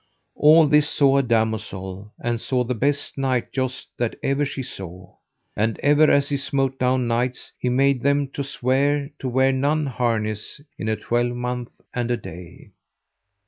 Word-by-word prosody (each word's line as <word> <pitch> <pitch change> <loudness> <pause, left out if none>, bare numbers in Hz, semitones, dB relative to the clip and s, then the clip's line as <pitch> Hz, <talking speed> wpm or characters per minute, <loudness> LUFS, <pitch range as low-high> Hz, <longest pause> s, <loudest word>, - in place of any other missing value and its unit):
All 155 +1 +6
this 150 0 +4
saw 140 -1 +3
a - - +4
damosel, 105 -4 -2
and 120 -1 -2
saw 125 -2 0
the 125 +1 -2
best 140 +3 -1
knight 130 -3 -1
joust 130 -1 -3
that 120 -2 -1
ever 140 +2 +1
she 135 -1 -4
saw. 90 -6 -9 0.4
And 110 +2 0
ever 150 +1 +5
as 140 0 +3
he 140 - 0
smote 135 -1 -1
down 125 0 +2
knights 120 +2 -2
he 125 - 0
made 135 0 +2
them 140 +1 +2
to 140 - -4
swear 140 +3 0
to 130 - -3
wear 130 +2 +3
none 145 +3 +1
harness 115 -5 -2 0.2
in 110 - -2
a 110 - +1
twelvemonth 120 +2 -2
and 120 -1 -2
a 120 - +1
day. 85 -4 -11
125 Hz, 165 wpm, -23 LUFS, 115-140 Hz, 0.4 s, All